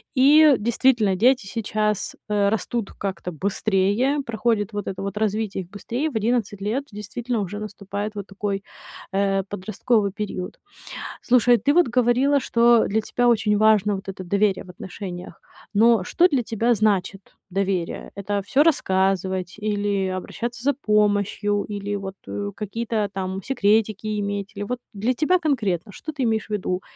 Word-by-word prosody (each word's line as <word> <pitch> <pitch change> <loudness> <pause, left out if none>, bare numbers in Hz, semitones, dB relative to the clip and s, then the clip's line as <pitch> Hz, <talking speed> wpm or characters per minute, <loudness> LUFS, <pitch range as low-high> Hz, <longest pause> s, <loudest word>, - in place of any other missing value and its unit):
И 290 +2 +7
действительно, 230 -2 +2
дети 245 +2 +3
сейчас, 210 -1 -2
э, 205 -1 +2
растут 220 +1 -2
как-то 190 -2 -4
быстрее, 200 - +1
проходит 220 -2 0
вот 205 -1 -4
это 195 0 -4
вот 200 +1 -4
развитие 210 -2 -1
их - - -24
быстрее. 240 +10 -3
В 250 - -12
11 220 -2 0
лет 230 +8 -1
действительно 215 +3 -3
уже 205 +2 -5
наступает 205 0 -5
вот 200 - -5
такой, 200 0 -3 0.5
э, 195 0 +1
подростковый 205 +2 0
период. 195 -3 -5 0.6
Слушай, 245 -1 +4
ты 280 +7 +2
вот 350 -3 +4
говорила, 250 +4 +3
что 235 -2 +4
для 220 +2 +1
тебя 245 +3 0
очень 215 -3 +3
важно 210 -1 +4
вот 195 - -10
это 190 -1 -5
доверие 200 +2 +1
в 185 - -13
отношениях. 180 -1 -8 0.3
Но 225 -1 +4
что 350 - +3
для 270 -7 0
тебя 230 +2 +1
значит 200 -2 0 0.2
доверие? 185 -2 -2
Это 200 0 -2
всё 275 +7 +4
рассказывать, 190 - +1
или 205 -2 0
обращаться 230 +6 -5
за 285 +1 +2
помощью, 205 -3 +1
или 205 0 -4
вот, 195 -1 -6
э, 100 0 -4
какие-то 215 0 -2
там 190 0 -4
секретики 215 -3 +1
иметь, 200 0 -3
или 200 - -5
вот 250 +4 -3
для 220 +4 0
тебя 315 +8 +2
конкретно, 210 - -1
что 310 +10 -7
ты 280 - -4
имеешь 220 -3 0
в - - -26
виду: 185 -3 -2
210 Hz, 155 wpm, -23 LUFS, 195-235 Hz, 0.6 s, И